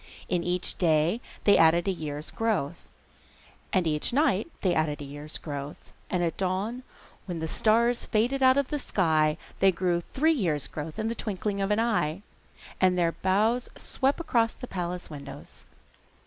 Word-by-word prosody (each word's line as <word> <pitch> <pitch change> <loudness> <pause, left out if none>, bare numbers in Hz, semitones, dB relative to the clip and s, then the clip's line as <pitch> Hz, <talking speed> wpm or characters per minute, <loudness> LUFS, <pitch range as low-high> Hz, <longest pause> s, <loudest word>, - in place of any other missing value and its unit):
In 175 -2 0
each 180 0 0
day 165 +5 +2 0.2
they 205 - +5
added 165 +3 +5
a - - +3
year's 150 -4 -4
growth, 195 -9 -2 0.8
and 185 -2 +2
each 150 -2 0
night 265 - +2
they 185 -3 +2
added 155 -2 0
a 145 - -6
year's 145 +2 -6
growth, 145 0 -7 0.2
and 180 -1 0
at 165 -2 -1
dawn, 195 +6 -1 0.5
when 175 -2 -3
the 160 0 -3
stars 230 +7 +2
faded 245 +5 +1
out 260 0 +6
of 280 -2 +1
the 295 - -1
sky, 160 - +2 0.2
they 195 0 +5
grew 175 -1 0
three 315 +4 +3
years' 170 - 0
growth 155 +1 -6
in 220 - -1
the 230 - -1
twinkling 205 -2 -3
of 195 - 0
an 210 +1 +2
eye, 205 -6 0 0.6
and 185 -1 +4
their 170 -1 +2
boughs 215 +8 +1
swept 270 +4 0
across 235 -9 +1
the - - -7
palace 180 -5 -4
windows. 140 -1 -10
185 Hz, 170 wpm, -27 LUFS, 160-225 Hz, 0.8 s, out